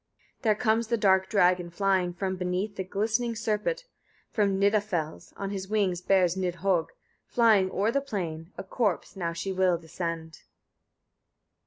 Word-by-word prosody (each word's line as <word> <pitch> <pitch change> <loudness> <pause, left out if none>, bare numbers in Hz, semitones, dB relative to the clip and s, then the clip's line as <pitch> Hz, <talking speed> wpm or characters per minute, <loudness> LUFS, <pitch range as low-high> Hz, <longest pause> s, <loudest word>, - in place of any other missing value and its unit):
65. - - -43
There 215 -4 +3
comes 225 0 +1
the 235 0 +1
dark 190 -2 +3
dragon 180 -4 +3
flying 185 0 +1
from 190 +2 -3
beneath 185 +3 -2
the 190 - -3
glistening 220 +5 -1
serpent, 225 - -1 0.5
from 200 -3 +1
Nida 205 +1 +4
fels. 170 -7 -4
On 195 0 -4
his 190 -1 -4
wings 195 -4 0
bears 180 -2 +3
Nidhögg, 180 -1 0 0.4
flying 220 -5 +4
o'er 200 +4 +1
the 280 - +1
plain, 170 - -5
a - - -5
corpse. 205 -1 -1
Now 170 -3 -2
she 170 +4 -3
will 185 -2 +2
descend. 165 -1 -5
190 Hz, 155 wpm, -28 LUFS, 180-215 Hz, 0.5 s, Nida